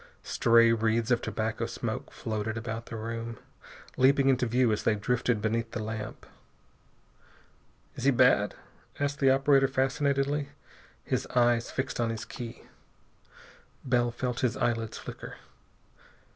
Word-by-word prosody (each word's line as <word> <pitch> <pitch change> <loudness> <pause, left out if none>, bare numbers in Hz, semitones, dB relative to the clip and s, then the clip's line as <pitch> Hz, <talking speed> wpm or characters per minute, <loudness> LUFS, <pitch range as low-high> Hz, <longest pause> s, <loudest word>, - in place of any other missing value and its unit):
Stray 115 0 +4
wreaths 115 +1 +1
of 120 - +3
tobacco 110 0 -2
smoke - - -4
floated 110 +1 -3
about 115 0 -5
the - - -7
room, 115 +1 -5 0.6
leaping 135 +1 +4
into 130 -2 +2
view 120 0 +2
as 105 - 0
they 110 - +2
drifted 115 +1 0
beneath 115 +1 0
the 110 - -3
lamp. 110 -1 -6 1.7
"Is - - -5
he - - +6
bad?" 125 -5 +4 0.4
asked 145 0 -1
the 135 - +4
operator 135 0 +4
fascinatedly, 140 +2 0 0.5
his - - -2
eyes 120 -1 +3
fixed 130 - -3
on 115 -1 +1
his 115 -1 -4
key. 120 0 -8 1.2
Bell 120 -2 +2
felt 125 +1 -3
his 125 -1 0
eyelids 115 -3 -1
flicker. - - -8
120 Hz, 130 wpm, -29 LUFS, 115-130 Hz, 1.7 s, he